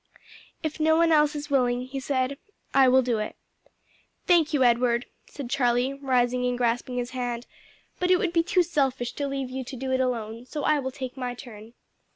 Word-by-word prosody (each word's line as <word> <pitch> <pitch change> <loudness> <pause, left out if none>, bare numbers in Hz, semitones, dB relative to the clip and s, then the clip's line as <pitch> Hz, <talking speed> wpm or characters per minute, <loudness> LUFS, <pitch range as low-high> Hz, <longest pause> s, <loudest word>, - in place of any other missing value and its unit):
"If 315 0 -3
no 315 +1 +4
one 335 0 +4
else 300 -1 +4
is 295 0 -6
willing," 250 -2 +2
he 265 +2 -5
said, 265 +1 -1 0.3
"I 270 -1 +6
will 260 +1 +5
do 235 -3 0
it." 215 - -4 0.9
"Thank 335 -4 +4
you, 285 -4 +3
Edward," 240 0 +3 0.2
said 280 -4 -7
Charlie, 250 0 +1
rising 250 -2 +1
and 245 0 -1
grasping 245 +1 -1
his 245 0 -3
hand; 245 -1 -3 0.5
"but 360 - 0
it 365 - +6
would 365 -4 -1
be 335 - +4
too 360 +1 +2
selfish 270 -7 -1
to 285 - -3
leave 275 -2 -3
you 260 0 -4
to 260 +2 -8
do 260 +1 -4
it 260 - +1
alone; 235 -1 -3
so 295 0 -4
I 305 -1 +3
will 265 -1 -3
take 260 -1 -7
my 250 -1 -3
turn." 225 -3 -11
260 Hz, 200 wpm, -26 LUFS, 245-290 Hz, 0.9 s, I